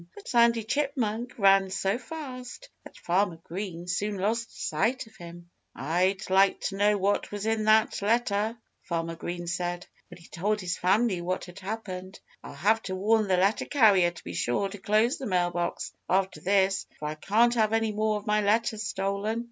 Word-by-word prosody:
But 410 - -12
Sandy 235 -2 +4
Chipmunk 250 -2 -2
ran 195 -2 +5
so 195 +4 -1
fast 260 - -8
that - - -13
Farmer 180 0 0
Green 175 -1 -6
soon 200 +3 -1
lost 225 +4 -2
sight 240 +5 0
of 220 0 -19
him. 175 -2 -12 0.2
"I'd 180 +7 0
like 195 +1 +4
to 195 - -3
know 205 +1 +3
what 200 +1 0
was 205 0 -4
in 220 -1 0
that 215 -1 +3
letter," 220 0 +1 0.2
Farmer 165 -1 -3
Green 175 +1 -5
said, 175 0 -3 0.2
when - - -11
he 170 - -16
told 210 +5 -1
his 180 -2 -2
family 190 0 +2
what 185 +2 -2
had 175 0 -11
happened. 190 -2 -6 0.2
"I'll - - -9
have 210 +9 +2
to 185 - -2
warn 215 +3 +2
the 185 -1 +2
letter 195 +4 +2
carrier 205 -10 +4
to 175 - -13
be 85 - -7
sure 120 - 0
to 205 +1 -9
close 215 +5 +2
the 265 - -4
mail 180 -2 +1
box 175 0 -3 0.2
after 190 +1 0
this, 195 0 +2
for 150 - -5
I - - -3
can't 220 +9 +2
have 220 -3 +2
any 225 -1 +1
more 215 0 0
of 205 - -9
my 210 0 +2
letters 220 +1 +1
stolen." 200 +2 -2
200 Hz, 190 wpm, -27 LUFS, 180-220 Hz, 0.2 s, ran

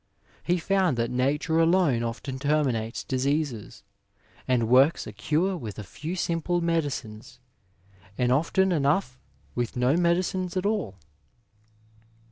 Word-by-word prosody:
He 175 +1 +1
found 185 -5 +1
that 115 +1 -1
Nature 145 +6 +1
alone 165 -7 +3
often 120 +3 -4
terminates 135 -6 0
diseases, 135 -5 -2 0.6
and 125 -3 +2
works 130 +6 +4
a - - -7
cure 160 - 0
with 115 - -7
a 110 - -6
few 155 - -6
simple 175 0 -1
medicines, 135 -8 -3 0.8
and 125 -1 +1
often 175 +7 +2
enough 145 -3 +1 0.3
with 120 -2 -3
no 125 +3 +2
medicines 180 +1 0
at 185 - -1
all." 205 - -1
145 Hz, 120 wpm, -26 LUFS, 125-170 Hz, 0.8 s, works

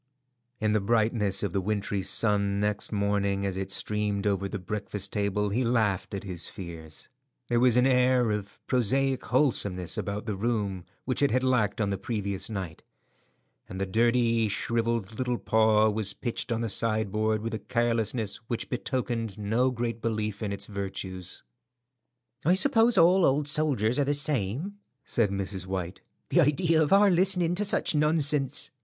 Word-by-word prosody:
In 110 -1 +1
the 105 -1 +2
brightness 110 -2 +1
of 100 -4 -2
the 95 - 0
wintry 100 0 -2
sun 100 -1 +1
next 105 0 -1
morning 100 -1 0
as 95 -2 -2
it 95 0 -4
streamed 105 0 -1
over 100 -1 0
the 105 - -4
breakfast 100 0 -5
table 105 0 0
he 120 +6 0
laughed 110 -5 0
at 100 - -5
his 90 -4 -5
fears. 85 -5 -9 0.4
There 120 -1 +2
was 125 -1 +4
an 125 - +4
air 125 -2 +3
of 100 -1 -4
prosaic 130 +2 +1
wholesomeness 100 - 0
about 100 +1 -4
the 105 -3 -3
room 100 -4 -2 0.2
which 130 +1 -2
it 140 - +4
had 130 +2 +1
lacked 125 -6 +1
on 100 -2 0
the 100 - -3
previous 100 -2 -3
night, 95 -7 -5 0.9
and 95 - -6
the 95 - 0
dirty, 115 +1 +2
shrivelled 115 0 -2
little 125 -1 0
paw 110 -1 +3
was 105 -1 0
pitched 120 0 -4
on 115 0 0
the 115 - -1
sideboard 110 0 0
with 115 0 -4
a 110 - -3
carelessness 115 -2 -1
which 120 - -3
betokened 120 -4 -2
no 110 +5 +1
great 115 -2 -3
belief 110 -2 -2
in 105 -2 -2
its 100 - -4
virtues. 95 -3 -5 1.0
"I 175 +5 +4
suppose 230 0 +5
all 180 +2 +5
old 145 +1 +2
soldiers 145 -6 +1
are - - +4
the 145 +1 +1
same," 145 - -1 0.3
said 115 -4 +1
Mrs. 95 -1 -4
White. 95 -1 -4 0.3
"The - - +4
idea 160 +3 +2
of 155 - +1
our 200 0 +6
listening 180 -1 +3
to 195 +4 -1
such 200 - +1
nonsense! 150 -2 +2
110 Hz, 165 wpm, -27 LUFS, 100-125 Hz, 1.0 s, our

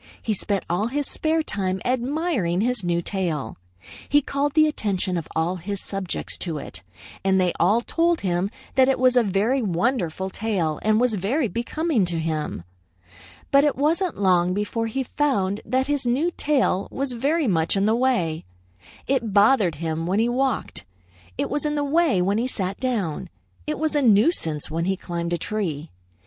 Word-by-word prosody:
He 220 - -1
spent 200 -1 -2
all 180 +6 0
his 285 +4 -1
spare 320 0 0
time 190 -7 -2
admiring 250 - 0
his 245 -2 0
new 170 -1 0
tail. 165 - -3 0.5
He 290 - +5
called 280 0 -1
the 310 -1 +6
attention 195 -10 -1
of 165 -3 -3
all 170 +3 0
his 195 +3 -4
subjects 195 -3 -4
to 165 -4 -2
it, 145 - -8 0.4
and 190 0 +3
they 180 -2 +2
all 205 +7 +3
told 335 +6 +1
him 180 0 0 0.2
that 265 0 +4
it 270 - +2
was 255 0 +3
a 245 - +6
very 220 +6 +1
wonderful 190 -2 -1
tail 185 -9 -1
and 215 0 +2
was 245 -1 +2
very 225 - 0
becoming 240 - -1
to 170 -1 -2
him. 155 - -3 0.9
But 275 0 +6
it 295 - +2
wasn't 325 - 0
long 180 -2 +3
before 215 +3 -1
he 265 +4 -2
found 215 -8 0
that 260 +3 +1
his 285 -3 -1
new 285 +9 +1
tail 265 -10 +1
was 270 -1 -3
very 285 +5 +1
much 165 -1 +1
in 195 - +2
the 220 +1 +3
way. 235 -11 0 0.6
It 235 -6 0
bothered 205 - +4
him 165 +1 -3
when 190 +3 +1
he 225 +2 +3
walked. 260 0 -1 0.5
It - - 0
was 290 +1 -2
in 300 0 -1
the 290 - 0
way 285 - +2
when 200 +4 +1
he 245 - 0
sat 195 -6 -3
down. 215 - -2 0.4
It - - -2
was 315 +1 -1
a 295 - +3
nuisance 205 - +2
when 165 +1 -1
he 190 +1 0
climbed 170 -1 -4
a - - +1
tree. 165 -5 -3
215 Hz, 180 wpm, -23 LUFS, 180-270 Hz, 0.9 s, the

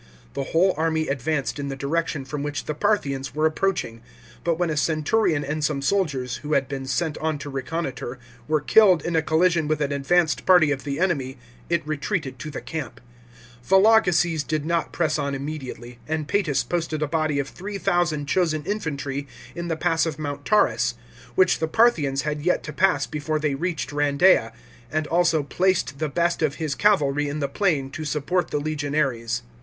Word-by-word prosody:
The 140 - -3
whole 180 +6 +3
army 160 0 0
advanced 140 +1 -1
in 140 - -3
the 135 - -4
direction 140 0 -2
from 140 +2 -5
which 145 -1 -3
the 150 - -2
Parthians 145 -8 -1
were 155 +1 +1
approaching, 155 -8 -1 0.4
but 170 -2 +1
when 175 -2 0
a - - -1
centurion 155 +1 +1
and 150 +2 -3
some 145 -1 0
soldiers, 140 -8 0
who 150 +1 -4
had 135 -2 +2
been 135 -1 -5
sent 160 +2 -1
on 160 -1 -1
to 145 0 -7
reconnoitre, 135 -2 -4 0.3
were 155 -1 +1
killed 185 +1 +5
in 170 - -1
a 160 - +4
collision 160 0 +2
with 155 -1 0
an 145 -1 -1
advanced 160 +4 +1
party 175 -5 +5
of 135 -1 -3
the 140 0 -3
enemy, 140 -8 0 0.3
it 170 -2 0
retreated 150 - -3
to 155 - -6
the 145 - -6
camp. 160 -2 -6 0.6
Vologeses 180 - +4
did 155 -1 -2
not 170 0 0
press 165 -3 0
on 140 -1 -1
immediately, 130 -4 -7
and 155 -1 -2
Paetus 180 -8 +1
posted 160 -3 -2
a - - 0
body 155 -1 0
of 140 -1 -1
3000 175 -6 -1
chosen 155 -1 0
infantry 145 -8 -3 0.3
in 170 0 -5
the 165 -2 -2
pass 165 +1 +1
of 155 - -4
Mount 145 -2 -5
Taurus, - - +2 0.4
which 185 -1 +4
the 160 - 0
Parthians 155 - +2
had 150 -1 -2
yet 180 +4 +1
to 150 - -7
pass 145 -4 +2
before 155 +1 -2
they 150 -2 0
reached 160 -1 -3
Kandeia, 145 -2 +3 0.4
and 155 0 0
also 165 -1 +2
placed 170 -4 0
the 155 -1 -1
best 170 +4 0
of 150 -3 +1
his 155 -1 -2
cavalry 145 -7 +2
in 145 - -3
the 140 - 0
plain 140 -4 0
to 155 - -5
support 155 +4 -1
the - - -2
legionaries. 145 -6 -1
155 Hz, 185 wpm, -24 LUFS, 140-170 Hz, 0.6 s, killed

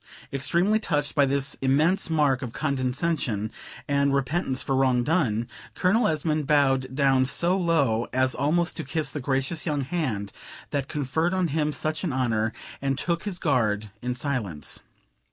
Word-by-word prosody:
Extremely 175 +10 +2
touched 150 -8 -1
by 140 -2 +4
this 140 0 +1
immense 155 +9 +3
mark 145 -5 +2
of 125 -4 -5
condescension 130 -5 -1 0.4
and 140 -1 +2
repentance 135 0 0
for 135 - 0
wrong 130 -2 +3
done, 120 -7 +1 0.3
Colonel 210 +5 +3
Esmond 155 -1 0
bowed 135 -3 +2
down 135 -2 +3
so 175 +6 +1
low 145 -11 +1
as 130 0 +2
almost 165 +6 +1
to 160 - -3
kiss 155 -3 -2
the 150 - -4
gracious 135 +4 -1
young 145 -2 0
hand 130 - -2 0.4
that 140 -2 -1
conferred 160 +5 -1
on 185 -3 +1
him 150 +1 0
such 155 +2 -2
an 175 - -1
honor, 115 -4 0 0.3
and 135 -1 0
took 170 +3 -1
his 200 -4 -3
guard 110 - 0
in 125 0 -2
silence. 115 - -2
140 Hz, 155 wpm, -26 LUFS, 130-160 Hz, 0.4 s, by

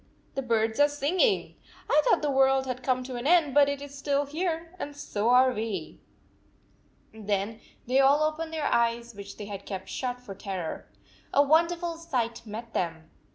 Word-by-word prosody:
The 275 - -2
birds 225 -2 0
are 290 - +7
singing! 345 - +1 0.3
I 300 - +4
thought - - +3
the 295 - +1
world 270 0 +3
had 255 -1 -4
come 255 0 0
to 250 -1 -6
an 240 +3 -3
end, 325 -5 +4
but 285 0 +6
it 285 0 -3
is 285 -1 -10
still 280 0 0
here, 330 +2 -3
and 290 0 -5
^so 230 -6 -2
are 255 +1 +5
we." 210 -7 -4 1.1
Then 210 0 -2 0.2
they 255 +3 +2
all 280 +3 +5
opened 315 +1 -2
their 315 -2 -2
eyes, 235 0 +1
which 200 -1 -10
they 205 - -6
had 200 -1 -8
kept 190 -1 -6
shut 250 -1 -3
for 240 -6 -9
terror. 190 -4 -5 0.4
A 285 - +5
wonderful 335 +3 +2
sight 245 -9 -3
met 225 +2 -7
them 165 -2 -3
260 Hz, 180 wpm, -28 LUFS, 220-290 Hz, 1.1 s, are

